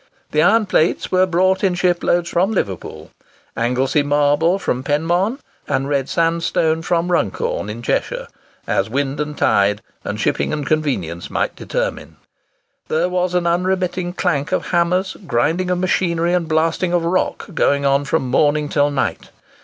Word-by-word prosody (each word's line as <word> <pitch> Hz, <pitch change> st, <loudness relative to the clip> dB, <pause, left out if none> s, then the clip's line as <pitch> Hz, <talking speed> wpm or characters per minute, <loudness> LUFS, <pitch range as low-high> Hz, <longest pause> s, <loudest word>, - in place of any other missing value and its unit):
The 150 Hz, -, +2 dB
iron 215 Hz, +6 st, +4 dB
plates 175 Hz, -3 st, +1 dB
were 185 Hz, 0 st, +3 dB
brought 185 Hz, +2 st, +2 dB
in 185 Hz, -2 st, +2 dB
ship 180 Hz, -1 st, +1 dB
loads 175 Hz, 0 st, +1 dB
from 185 Hz, +5 st, +1 dB
Liverpool, 95 Hz, -, -4 dB, 0.4 s
Anglesey 125 Hz, +5 st, +1 dB
marble 145 Hz, +5 st, +2 dB
from 130 Hz, -9 st, -2 dB
Penmon, 175 Hz, -, 0 dB, 0.3 s
and 135 Hz, -, 0 dB
red 140 Hz, -2 st, -1 dB
sandstone 165 Hz, -1 st, +1 dB
from 170 Hz, +1 st, 0 dB
Runcorn, 105 Hz, -, -1 dB
in 115 Hz, +3 st, -7 dB
Cheshire, -, -, -1 dB, 0.4 s
as -, -, 0 dB
wind 140 Hz, +3 st, -2 dB
and 150 Hz, 0 st, -3 dB
tide, 105 Hz, 0 st, +2 dB, 0.2 s
and -, -, -4 dB
shipping -, -, 0 dB
and 150 Hz, -2 st, -3 dB
convenience, 125 Hz, -, -2 dB
might -, -, -1 dB
determine. -, -, -4 dB, 0.7 s
There 165 Hz, +3 st, 0 dB
was 180 Hz, 0 st, -1 dB
an 175 Hz, -1 st, +1 dB
unremitting 180 Hz, 0 st, 0 dB
clank 160 Hz, -7 st, -1 dB
of -, -, -1 dB
hammers, 180 Hz, +2 st, +1 dB
grinding 160 Hz, +10 st, +1 dB
of 180 Hz, -, +1 dB
machinery, 175 Hz, -2 st, +1 dB
and 175 Hz, -2 st, 0 dB
blasting 165 Hz, +3 st, +1 dB
of 170 Hz, -1 st, +1 dB
rock, 185 Hz, +2 st, -1 dB
going 140 Hz, -2 st, +2 dB
on 140 Hz, +1 st, +3 dB
from 140 Hz, -2 st, 0 dB
morning 145 Hz, +3 st, +2 dB
till 145 Hz, 0 st, +2 dB
night. 140 Hz, -2 st, -2 dB
165 Hz, 155 wpm, -19 LUFS, 145-180 Hz, 0.7 s, iron